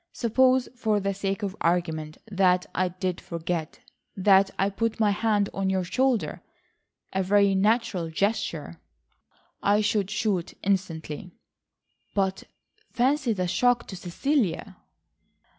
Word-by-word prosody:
"Suppose, 255 Hz, +2 st, +3 dB
for 220 Hz, -4 st, +1 dB
the 195 Hz, 0 st, -1 dB
sake 195 Hz, +2 st, -3 dB
of 195 Hz, -1 st, -3 dB
argument, 160 Hz, -3 st, 0 dB
that 185 Hz, -4 st, +2 dB
I 185 Hz, -, +1 dB
did 180 Hz, 0 st, -3 dB
forget,—that 180 Hz, +3 st, 0 dB
I 195 Hz, +1 st, +1 dB
put 230 Hz, +3 st, -2 dB
my 210 Hz, -2 st, +4 dB
hand 205 Hz, -1 st, +1 dB
on 195 Hz, -1 st, -1 dB
your 190 Hz, -1 st, +1 dB
shoulder—a 235 Hz, -3 st, -3 dB
very 200 Hz, +1 st, +3 dB
natural 195 Hz, -3 st, +1 dB
gesture." 160 Hz, -, -2 dB, 0.8 s
"I 205 Hz, +1 st, +3 dB
should 205 Hz, -2 st, 0 dB
shoot 210 Hz, -4 st, -1 dB
instantly." 180 Hz, -4 st, -2 dB, 0.9 s
"But 190 Hz, -1 st, 0 dB, 0.4 s
fancy 260 Hz, +1 st, +1 dB
the 185 Hz, -3 st, -1 dB
shock 240 Hz, +6 st, +2 dB
to 190 Hz, -, -6 dB
Cecilia." 190 Hz, -, -1 dB
195 Hz, 115 wpm, -26 LUFS, 180-220 Hz, 0.9 s, my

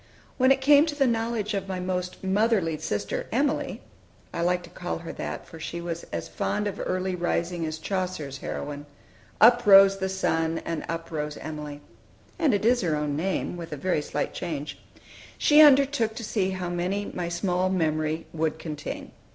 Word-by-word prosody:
When 260 Hz, +1 st, +5 dB
it 270 Hz, 0 st, +3 dB
came 290 Hz, +3 st, +6 dB
to 300 Hz, -, -3 dB
the 280 Hz, -2 st, +3 dB
knowledge 225 Hz, -2 st, -1 dB
of 195 Hz, -1 st, -2 dB
my 190 Hz, -1 st, -3 dB
most 180 Hz, 0 st, -3 dB
motherly 195 Hz, -4 st, +2 dB
sister 100 Hz, 0 st, -3 dB
Emilie, 280 Hz, +5 st, 0 dB, 0.5 s
I -, -, -2 dB
like 180 Hz, +1 st, +1 dB
to 170 Hz, -, -13 dB
call 180 Hz, -1 st, -4 dB
her 165 Hz, 0 st, -7 dB
that, -, -, -6 dB
for 165 Hz, -, -11 dB
she 170 Hz, +2 st, -5 dB
was 170 Hz, -1 st, -5 dB
as 85 Hz, -, -5 dB
fond 210 Hz, -, -2 dB
of 200 Hz, -1 st, -3 dB
early 185 Hz, 0 st, -1 dB
rising 175 Hz, -1 st, -1 dB
as 155 Hz, 0 st, -4 dB
Chaucer's 180 Hz, -7 st, -3 dB
heroine: 145 Hz, +1 st, -5 dB, 0.5 s
"Up 240 Hz, +2 st, +7 dB
rose 195 Hz, 0 st, +8 dB
the 190 Hz, 0 st, -1 dB
sun, 165 Hz, -3 st, 0 dB
and 165 Hz, -2 st, -3 dB
up 165 Hz, 0 st, -4 dB
rose 150 Hz, -1 st, -3 dB
Emilie;" 150 Hz, -2 st, -7 dB, 0.6 s
and 315 Hz, -5 st, +3 dB
it 205 Hz, -, -1 dB
is 245 Hz, +1 st, +4 dB
her 165 Hz, -5 st, +1 dB
own 150 Hz, -1 st, -1 dB
name, 180 Hz, +2 st, -2 dB
with 170 Hz, -1 st, -7 dB
a 150 Hz, -, -4 dB
very 175 Hz, +1 st, 0 dB
slight -, -, -3 dB
change, 155 Hz, -4 st, -5 dB, 0.6 s
she 300 Hz, +1 st, +6 dB
undertook 275 Hz, -6 st, +5 dB
to 230 Hz, -, -6 dB
see 205 Hz, -3 st, 0 dB
how 185 Hz, -1 st, -3 dB
many 180 Hz, +4 st, -2 dB
my 175 Hz, -1 st, -3 dB
small 180 Hz, +1 st, 0 dB
memory 155 Hz, -3 st, 0 dB
would 160 Hz, -1 st, -1 dB
contain. 150 Hz, -2 st, -6 dB
180 Hz, 185 wpm, -26 LUFS, 160-205 Hz, 0.6 s, rose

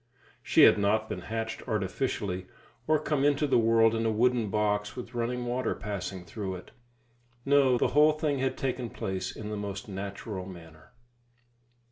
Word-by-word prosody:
She -, -, +4 dB
had -, -, +7 dB
not 110 Hz, +2 st, +2 dB
been -, -, -4 dB
hatched 115 Hz, 0 st, -4 dB
artificially, 95 Hz, -3 st, -2 dB, 0.4 s
or 155 Hz, 0 st, +4 dB
come 150 Hz, -2 st, -1 dB
into 145 Hz, +1 st, +3 dB
the 135 Hz, -, +3 dB
world 115 Hz, 0 st, +4 dB
in 115 Hz, 0 st, 0 dB
a 115 Hz, -, +2 dB
wooden 115 Hz, 0 st, +2 dB
box 105 Hz, 0 st, 0 dB
with 125 Hz, -1 st, -8 dB
running 120 Hz, +1 st, -2 dB
water 125 Hz, +1 st, -1 dB
passing 95 Hz, -3 st, -5 dB
through 95 Hz, +1 st, -5 dB
it. 90 Hz, -, -11 dB, 0.7 s
No, 135 Hz, -3 st, +4 dB
the -, -, +2 dB
whole 150 Hz, +2 st, +5 dB
thing 150 Hz, -2 st, -1 dB
had 130 Hz, 0 st, -1 dB
taken 125 Hz, -2 st, -2 dB
place 95 Hz, -3 st, -4 dB
in 105 Hz, -1 st, -6 dB
the 105 Hz, -, -3 dB
most 100 Hz, 0 st, -5 dB
natural 100 Hz, 0 st, -6 dB
manner. 80 Hz, -4 st, -13 dB
110 Hz, 165 wpm, -29 LUFS, 100-125 Hz, 0.7 s, had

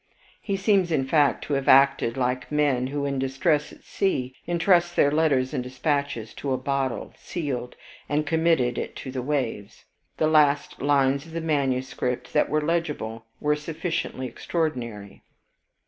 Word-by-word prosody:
He 200 Hz, -2 st, -2 dB
seems, 195 Hz, -3 st, +2 dB
in 135 Hz, -4 st, +1 dB
fact, 145 Hz, 0 st, +2 dB
to 145 Hz, -, -3 dB
have 135 Hz, -1 st, -1 dB
acted 135 Hz, -3 st, +5 dB
like 125 Hz, +1 st, -1 dB
men, 145 Hz, -4 st, +2 dB
who, 140 Hz, +1 st, -2 dB
in 140 Hz, -1 st, -1 dB
distress 145 Hz, +3 st, 0 dB
at -, -, -16 dB
sea, 130 Hz, -10 st, -1 dB
intrust 175 Hz, 0 st, +3 dB
their 145 Hz, -, +4 dB
letters 145 Hz, -4 st, +2 dB
and 130 Hz, -4 st, -1 dB
dispatches 130 Hz, -2 st, -2 dB
to 140 Hz, -, -3 dB
a -, -, 0 dB
bottle 135 Hz, -2 st, -2 dB
sealed, 135 Hz, -7 st, -4 dB, 0.3 s
and 150 Hz, +1 st, +1 dB
commit 160 Hz, +1 st, +3 dB
it 120 Hz, -1 st, -2 dB
to 130 Hz, -, -7 dB
the 130 Hz, -1 st, -3 dB
waves. 125 Hz, -7 st, -3 dB, 0.3 s
The -, -, +2 dB
last 150 Hz, -2 st, +3 dB
lines 140 Hz, +1 st, +2 dB
of 160 Hz, -, -13 dB
the 165 Hz, -, -2 dB
manuscript 130 Hz, -5 st, -1 dB
that 150 Hz, -, +3 dB
were 155 Hz, 0 st, +1 dB
legible, 150 Hz, -9 st, -2 dB
were 150 Hz, 0 st, +2 dB
sufficiently 160 Hz, -2 st, -3 dB
extraordinary. 120 Hz, -, -4 dB
140 Hz, 155 wpm, -25 LUFS, 130-155 Hz, 0.3 s, acted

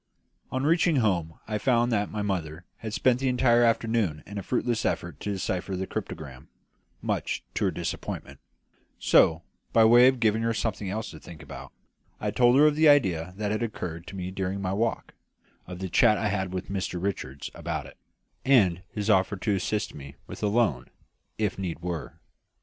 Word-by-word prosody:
On 130 Hz, +1 st, -1 dB
reaching 165 Hz, +2 st, +3 dB
home 90 Hz, -, +1 dB
I 105 Hz, -1 st, -2 dB
found 120 Hz, 0 st, +2 dB
that 105 Hz, -2 st, +1 dB
my 105 Hz, -1 st, -3 dB
mother 90 Hz, -4 st, -3 dB
had 110 Hz, -, -6 dB
spent 125 Hz, +3 st, +2 dB
the 135 Hz, -, 0 dB
entire 125 Hz, -2 st, +4 dB
afternoon 115 Hz, -8 st, +1 dB
in 100 Hz, +1 st, -6 dB
a -, -, -4 dB
fruitless 120 Hz, +2 st, -1 dB
effort 85 Hz, -4 st, -2 dB
to 105 Hz, -, -3 dB
decipher 95 Hz, 0 st, -2 dB
the 95 Hz, +1 st, -2 dB
cryptogram, 70 Hz, -5 st, -7 dB, 0.6 s
much -, -, -2 dB
to -, -, 0 dB
her -, -, +3 dB
disappointment; -, -, -5 dB, 0.6 s
so, 80 Hz, +1 st, +4 dB, 0.3 s
by 115 Hz, -1 st, +6 dB
way 120 Hz, +2 st, +8 dB
of 130 Hz, -1 st, +2 dB
giving 110 Hz, -1 st, +2 dB
her 115 Hz, 0 st, 0 dB
something 105 Hz, -3 st, -2 dB
else 110 Hz, +3 st, -4 dB
to 80 Hz, -, -11 dB
think 80 Hz, -1 st, -12 dB
about, 70 Hz, -, -10 dB, 0.5 s
I 105 Hz, -, -1 dB
told 120 Hz, +4 st, +4 dB
her 150 Hz, -, +7 dB
of 150 Hz, -1 st, +4 dB
the 155 Hz, 0 st, +5 dB
idea 90 Hz, -, +3 dB
that 105 Hz, -1 st, -1 dB
had 110 Hz, -, -1 dB
occurred 90 Hz, -7 st, -5 dB
to -, -, -8 dB
me 90 Hz, -1 st, -4 dB
during 95 Hz, +1 st, -3 dB
my 95 Hz, -1 st, -2 dB
walk; 115 Hz, +2 st, -1 dB, 0.5 s
of 90 Hz, 0 st, -7 dB
the 95 Hz, +1 st, -4 dB
chat 105 Hz, +5 st, +4 dB
I 105 Hz, -, 0 dB
had 105 Hz, -1 st, 0 dB
had -, -, -11 dB
with 90 Hz, 0 st, -4 dB
Mr 95 Hz, -2 st, -2 dB
Richards 85 Hz, -8 st, -4 dB
about -, -, -4 dB
it, -, -, -14 dB, 0.5 s
and 105 Hz, -11 st, +4 dB
of -, -, -21 dB
his 105 Hz, -1 st, -4 dB
offer 95 Hz, -2 st, +3 dB
to 105 Hz, +2 st, 0 dB
assist 105 Hz, +2 st, -2 dB
me 70 Hz, -1 st, -10 dB
with -, -, -9 dB
a 105 Hz, -, +1 dB
loan, 100 Hz, -, +1 dB, 0.5 s
if 105 Hz, -3 st, -1 dB
need 90 Hz, -4 st, -3 dB
were. 85 Hz, -4 st, -4 dB
105 Hz, 195 wpm, -27 LUFS, 90-115 Hz, 0.6 s, way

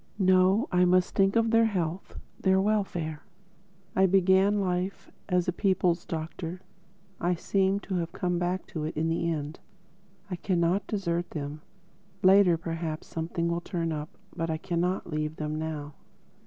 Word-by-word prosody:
No. 185 Hz, +2 st, +4 dB
I 180 Hz, -1 st, +4 dB
must 180 Hz, 0 st, +3 dB
think 195 Hz, +1 st, +3 dB
of 230 Hz, -1 st, +3 dB
their 230 Hz, 0 st, +5 dB
health, 180 Hz, -3 st, -3 dB, 0.2 s
their 190 Hz, 0 st, +3 dB
welfare. 190 Hz, -7 st, -1 dB, 0.7 s
I 190 Hz, 0 st, +5 dB
began 190 Hz, +2 st, +4 dB
life 185 Hz, 0 st, -2 dB, 0.2 s
as 180 Hz, -2 st, +2 dB
a -, -, +2 dB
people's 180 Hz, -2 st, +1 dB
doctor: 165 Hz, +2 st, -5 dB, 0.6 s
I 175 Hz, +1 st, +1 dB
seem 195 Hz, +3 st, +1 dB
to 195 Hz, -, -6 dB
have 170 Hz, -1 st, -2 dB
come 180 Hz, -2 st, -1 dB
back 180 Hz, +1 st, -1 dB
to 155 Hz, -, -3 dB
it 155 Hz, -, -5 dB
in 160 Hz, +1 st, +1 dB
the 165 Hz, +1 st, 0 dB
end. 150 Hz, -1 st, -4 dB, 0.7 s
I 180 Hz, -3 st, -4 dB
cannot 180 Hz, +2 st, +1 dB
desert 175 Hz, -4 st, -1 dB
them. 150 Hz, 0 st, -5 dB, 0.6 s
Later 185 Hz, -2 st, +6 dB
perhaps 165 Hz, -1 st, -4 dB
something 170 Hz, +1 st, -3 dB
will 170 Hz, 0 st, -1 dB
turn 170 Hz, -2 st, -2 dB
up. 150 Hz, 0 st, -5 dB, 0.2 s
But 165 Hz, -2 st, -2 dB
I 160 Hz, -, 0 dB
cannot 180 Hz, +2 st, -1 dB
leave 155 Hz, 0 st, -2 dB
them 155 Hz, 0 st, -3 dB
now." 150 Hz, -2 st, -4 dB
175 Hz, 155 wpm, -28 LUFS, 165-190 Hz, 0.7 s, Later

